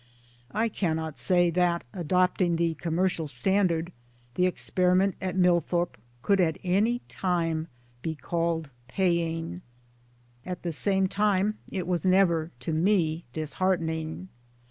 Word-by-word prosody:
I 225 Hz, +3 st, +1 dB
cannet 160 Hz, -7 st, -2 dB
say 175 Hz, -2 st, +3 dB
that, 175 Hz, 0 st, +1 dB
adopting; 180 Hz, 0 st, +1 dB
the 165 Hz, 0 st, +1 dB
commercial 165 Hz, 0 st, -1 dB
standard, 170 Hz, +5 st, +1 dB, 0.4 s
the 180 Hz, +6 st, +2 dB
experiment 185 Hz, +1 st, +2 dB
at 185 Hz, 0 st, -2 dB
Millthorpe 175 Hz, -1 st, +2 dB, 0.3 s
could 200 Hz, -2 st, +3 dB
at 160 Hz, -3 st, +1 dB
any 210 Hz, +7 st, +2 dB
time 165 Hz, -3 st, -1 dB, 0.3 s
be 160 Hz, +3 st, -3 dB
called 165 Hz, -1 st, -2 dB, 0.2 s
paying. 165 Hz, -, -1 dB, 0.8 s
At 180 Hz, +2 st, -6 dB
the 170 Hz, -2 st, -2 dB
same 195 Hz, +4 st, +2 dB
time 205 Hz, +1 st, +1 dB
it 185 Hz, -3 st, -3 dB
was 180 Hz, -1 st, -1 dB
never 180 Hz, -4 st, +3 dB
(to 155 Hz, -, -2 dB
me) 165 Hz, -1 st, +1 dB
disheartening. 160 Hz, +2 st, -2 dB
175 Hz, 120 wpm, -27 LUFS, 160-185 Hz, 0.8 s, say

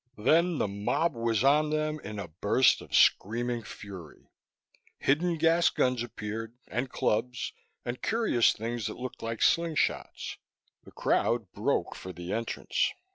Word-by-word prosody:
Then 160 Hz, +9 st, +3 dB
the -, -, +1 dB
mob 105 Hz, +12 st, 0 dB
was 115 Hz, -1 st, 0 dB
on 150 Hz, +2 st, +4 dB
them, 155 Hz, 0 st, -1 dB
in 105 Hz, -4 st, -7 dB
a 100 Hz, -, -5 dB
burst 100 Hz, +10 st, +3 dB
of -, -, -5 dB
screaming 120 Hz, +3 st, +3 dB
fury. 95 Hz, -7 st, -11 dB, 0.7 s
Hidden 165 Hz, +5 st, +1 dB
gas 165 Hz, +2 st, +4 dB
guns 125 Hz, -2 st, +1 dB
appeared, 115 Hz, 0 st, -5 dB
and 125 Hz, +2 st, -2 dB
clubs, 125 Hz, +1 st, -1 dB, 0.3 s
and 120 Hz, +1 st, -4 dB
curious 220 Hz, -, +3 dB
things 115 Hz, +1 st, -3 dB
that -, -, -6 dB
looked 130 Hz, 0 st, -7 dB
like 115 Hz, 0 st, -4 dB
slingshots. 165 Hz, -2 st, 0 dB, 0.5 s
The -, -, -13 dB
crowd -, -, 0 dB
broke -, -, 0 dB
for 95 Hz, -, -8 dB
the 90 Hz, +2 st, -5 dB
entrance. 115 Hz, -, -1 dB
120 Hz, 140 wpm, -29 LUFS, 105-155 Hz, 0.7 s, on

